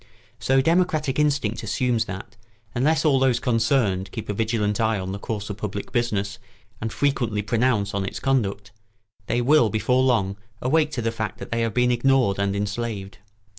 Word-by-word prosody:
So 135 +5 +3
democratic 155 -4 +1
instinct 140 -7 +1
assumes 115 +1 0
that, 100 +3 -8 0.4
unless 155 +6 +2
all 140 -3 +4
those 130 -3 +3
concerned 115 -6 +1
keep 110 -4 -6
a - - 0
vigilant 110 -1 0
eye 110 -1 +2
on 95 0 -4
the 100 - -5
course 105 -1 -4
of 100 - -6
public 100 -1 -5
business 105 -5 -1 0.4
and 110 0 -2
frequently 120 -7 0
pronounce 110 -2 +1
on 100 -1 -1
its 95 - -4
conduct, 105 -7 -1 0.6
they 120 +2 +1
will 135 -3 +5
before 110 +5 +1
long 105 -7 +1 0.2
awake 150 +4 +2
to 120 - -2
the 115 - 0
fact 110 -2 -4
that - - -9
they 115 0 0
have 115 -2 -1
been 125 0 +3
ignored 125 -5 +2
and 100 0 0
enslaved. 100 -1 -4
115 Hz, 175 wpm, -24 LUFS, 100-130 Hz, 0.6 s, will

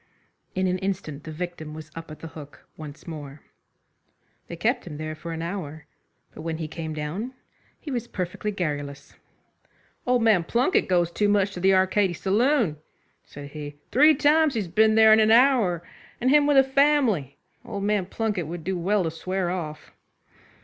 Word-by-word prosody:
In 185 0 +1
an 185 0 0
instant 180 -7 -4
the 155 - -6
victim 160 -2 -6
was 155 0 -10
up 165 0 -9
at 155 - -10
the 165 - -7
hook 150 -3 -12
once 155 0 -10
more. 150 -3 -8 1.0
They - - -6
kept - - -1
him 150 - -7
there 155 0 -4
for 155 +2 -8
an 165 0 -4
hour, 165 -4 -6 0.5
but - - -10
when 160 0 -3
he 160 -1 -4
came 160 0 -6
down 180 - -4 0.4
he 295 - -7
was 240 -2 -3
perfectly 185 +1 -4
garrulous. 145 -7 -4 0.9
"Old 250 -2 +3
man 210 -6 +4
Plunket 245 - +1
goes 175 -2 +2
too 205 +4 +1
much 200 -1 +2
to 180 - -6
the 190 +1 +4
Arcady 190 0 +2
Saloon," 210 - +1 0.5
said 140 0 -10
he. 145 -1 -7 0.2
"Three 300 +4 +6
times 300 0 +3
he's 210 -5 -1
been 220 +5 +3
there 220 0 +7
in 220 - +6
an 215 0 +4
hour; 225 -8 +4 0.4
and 255 +2 +2
him 295 0 +5
with 290 -1 +4
a 270 - +8
family. 265 - +2 0.3
Old 210 -5 -5
man 205 -3 0
Plunket 205 -6 -2
would 170 0 -6
do 190 +2 -2
well 195 +3 +1
to 165 - -2
swear 185 +2 -2
off." 155 -4 -6
185 Hz, 180 wpm, -25 LUFS, 155-220 Hz, 1.0 s, a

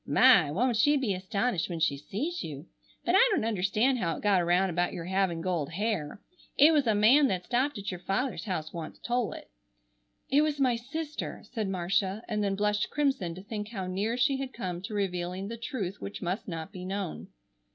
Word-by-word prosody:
My! 225 - +6
Won't 235 - +1
she 290 +6 +4
be 250 -8 0
astonished 190 0 -1
when 170 -2 -4
she 155 -3 +2
sees 225 - -4
you! 145 0 -7 0.4
But 350 - +2
I - - +7
don't 390 - +1
understand 220 +5 +1
how 165 -5 -1
it - - -10
got 200 -3 +4
around 175 +2 +2
about 175 +1 0
your 165 - -5
having 185 -2 0
gold 165 -4 -2
hair. 200 -4 -2 0.4
It 305 +3 +7
was 290 -5 +3
a 220 - +3
man 250 +8 +6
that 185 -4 -2
stopped 260 +2 0
at 200 0 -4
your 180 - -6
father's 235 +9 -2
house 160 -6 -3
once 165 -2 -6
told 240 -5 -1
it——" - - -12 0.8
"It 285 +2 +4
was 300 -2 0
my 255 -3 +3
sister!" 300 +6 -5
said 220 -5 -2
Marcia, 190 +3 0
and 210 -2 -1
then 200 -1 0
blushed 210 +1 0
crimson 265 - 0
to 185 - -9
think 210 0 -5
how 195 -5 -4
near 200 +6 -1
she 270 +2 +2
had 270 -1 -5
come 180 -6 -4
to 210 +3 -6
revealing 185 0 -2
the 230 - -4
truth 230 -7 -4
which 100 0 -6
must 185 +7 -3
not 165 -3 -5
be 180 - -8
known. 190 -2 -4
200 Hz, 205 wpm, -29 LUFS, 180-245 Hz, 0.8 s, I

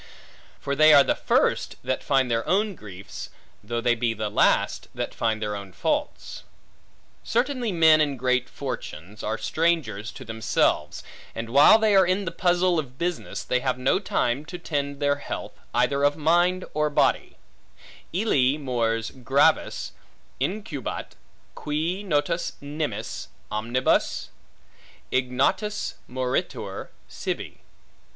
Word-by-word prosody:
For 140 - -2
they 155 +1 +7
are 140 - +8
the - - +2
first, - - +1
that 130 +1 -1
find 135 -3 +2
their 115 0 +1
own 205 +2 +2
griefs, 100 - -9 0.3
though 115 +3 -3
they 120 0 +3
be 115 -1 -1
the 105 -1 -3
last, - - +2
that - - -3
find 110 -1 0
their 105 -1 -2
own 100 -2 -8
faults. 90 - -2 0.8
Certainly 245 -1 0
men 160 -2 +6
in 145 -3 0
great 125 0 +1
fortunes 105 - -7
are 110 +1 -2
strangers 155 -11 0
to 130 - -10
themselves, 110 -8 0 0.3
and 115 0 -5
while 145 - +8
they 220 -2 +3
are 190 -2 +6
in 190 +2 +1
the 165 - -3
puzzle 175 -1 +2
of 135 -4 -6
business, 175 0 -3
they 125 - 0
have 125 - -1
no 130 +8 +2
time 135 -8 0
to 180 +2 -7
tend 140 -4 -3
their 145 0 +2
health, - - -6 0.2
either 130 +3 +1
of 145 0 +3
body 175 +4 +2
or 150 0 +1
mind. 145 - +2 0.8
Illi 150 - +2
mors 115 -5 -1
gravis 135 +3 +1 0.5
incubat, 165 - -3 0.4
qui 160 +6 -2
notus 165 -2 0
nimis 145 -7 -4 0.2
omnibus, 120 +4 0 0.8
ignotus 130 +12 0 0.2
moritur 125 0 -3 0.2
sibi. - - -5
140 Hz, 130 wpm, -25 LUFS, 120-170 Hz, 0.8 s, are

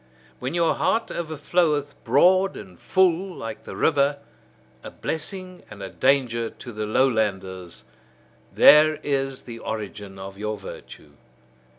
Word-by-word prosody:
When 130 +6 -4
your 170 -1 +3
heart 225 0 0
overfloweth 155 -2 0
broad 185 +10 +4
and 95 -4 -12
full 185 0 +1
like 115 -1 -7
the - - -8
river, 145 -2 +2 0.7
a - - -7
blessing 185 +3 -5
and 100 -2 -10
a 95 - -5
danger 125 -4 +1
to 120 - -11
the 105 -1 -4
lowlanders: 100 -7 -1 0.7
there 155 +1 +7
is 135 -2 -1
the 115 -2 -9
origin 105 -3 -6
of 95 +1 -9
your 105 0 -3
virtue. 95 -5 -11
135 Hz, 125 wpm, -24 LUFS, 105-160 Hz, 0.7 s, there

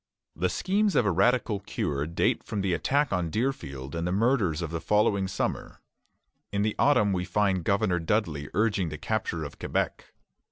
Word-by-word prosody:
The 90 +3 0
schemes 200 - +1
of 120 - +4
a 100 - +3
radical 105 +3 +2
cure 75 -6 -2
date 85 - 0
from 100 - -3
the 95 -2 0
attack 140 - +1
on 90 -2 0
Deerfield 70 - -3
and 85 +1 -2
the - - -1
murders 100 - +1
of 85 - -4
the 85 -1 -3
following 105 -2 +2
summer. 95 - -3 0.7
In 100 0 0
the 105 0 0
autumn 105 -8 +4
we 90 -1 -1
find 95 0 +1
Governor 100 -1 +1
Dudley 80 -6 -1
urging 100 -4 +1
the 75 - -6
capture 90 -2 -2
of 70 - -8
Quebec. - - -2
95 Hz, 175 wpm, -27 LUFS, 85-110 Hz, 0.7 s, of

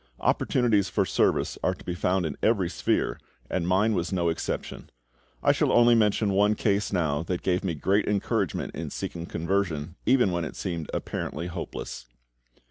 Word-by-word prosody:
Opportunities 110 -6 +2
for - - +1
service - - +1
are - - +1
to - - -16
be 90 - -2
found 90 +1 0
in 75 -3 -3
every 100 -6 +2
sphere, - - 0 0.3
and 85 -2 -1
mine 100 +5 +3
was 90 -2 -1
no 85 -3 +1
exception. 80 - -4 0.5
I - - +6
shall - - +1
only 120 0 +6
mention 105 -2 +3
one 105 +2 +3
case 100 -1 0
now 80 -6 0
that 85 +2 -3
gave 90 0 +1
me 90 -4 -1
great 100 +8 +1
encouragement 105 -2 -1
in - - -5
seeking 85 -1 -5
conversion 85 -3 -1
even 125 -6 +4
when 85 -1 -1
it 80 - -6
seemed 85 -5 -4
apparently 80 +4 -4
hopeless. 85 -7 -6
95 Hz, 170 wpm, -27 LUFS, 85-105 Hz, 0.5 s, I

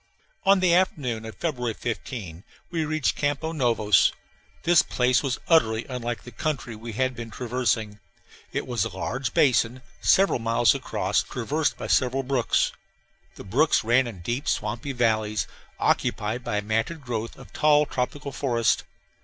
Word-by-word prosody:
On 195 -1 +5
the 180 -2 +4
afternoon 135 -11 +1
of 110 - -8
February 125 -9 -2
15 105 - -5 0.3
we 165 -2 -1
reached 155 -1 0
Campos 145 +3 -1
Novos. 115 - +3 0.5
This 175 -2 +6
place 125 0 +2
was 135 -3 -1
utterly 115 -9 +3
unlike 120 -2 -4
the 120 - -10
country 135 -3 -3
we 115 +1 -8
had 130 +3 0
been 115 -1 -7
traversing. 115 -3 -1 0.5
It - - -2
was 120 -5 0
a 105 -5 -5
large 125 +4 -3
basin, 125 -1 +3 0.2
several 195 -7 +4
miles 115 -3 +3
across, - - 0
traversed 145 +5 -1
by - - -6
several 130 +1 +2
brooks. 130 -3 +1 0.6
The - - -10
brooks 135 +11 +2
ran 120 +3 +3
in 100 -7 -8
deep 120 - -3
swampy 115 +6 -1
valleys, 110 -5 +1 0.3
occupied 110 +4 0
by 105 - -2
a - - 0
matted 115 +9 -1
growth 115 -3 -4
of - - -14
tall 150 -1 +4
tropical 140 +2 -3
forest. 120 -5 +1
125 Hz, 155 wpm, -25 LUFS, 110-140 Hz, 0.6 s, This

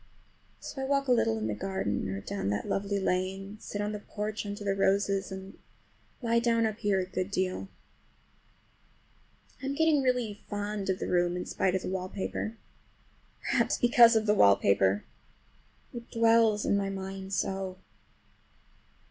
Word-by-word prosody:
So 270 - -7
I - - -1
walk 275 0 +1
a - - +2
little 115 - +3
in 110 - -3
the 110 - -1
garden 105 - -2
or 95 +1 -4
down 100 0 -3
that 100 0 -2
lovely 200 0 -1
lane, 190 +2 -2
sit 205 - -5
on 205 0 -1
the 210 - -4
porch 210 +1 -4
under 205 0 -5
the 200 -1 +1
roses, 195 0 +1
and 190 0 -8 0.6
lie 235 0 +3
down 230 -1 +2
up 215 0 -2
here 200 -2 +1
a 185 - -1
good 185 +1 -3
deal. 185 -1 -2 1.9
I'm 275 +1 -2
getting 315 -2 +3
really 250 -5 0
fond 205 -1 -3
of 190 - +1
the - - -4
room 175 0 +1
in 180 - -4
spite 190 -1 0
of 190 - -1
the - - -4
wallpaper. 190 +4 -4 0.8
Perhaps - - +1
because 240 -1 +6
of 220 -1 +2
the 210 - +4
wallpaper. 100 - +4 0.9
It 235 -1 -8
dwells 225 -2 +3
in - - +2
my 200 -1 0
mind 190 0 -6
so! 190 -1 -2
200 Hz, 160 wpm, -29 LUFS, 185-220 Hz, 1.9 s, because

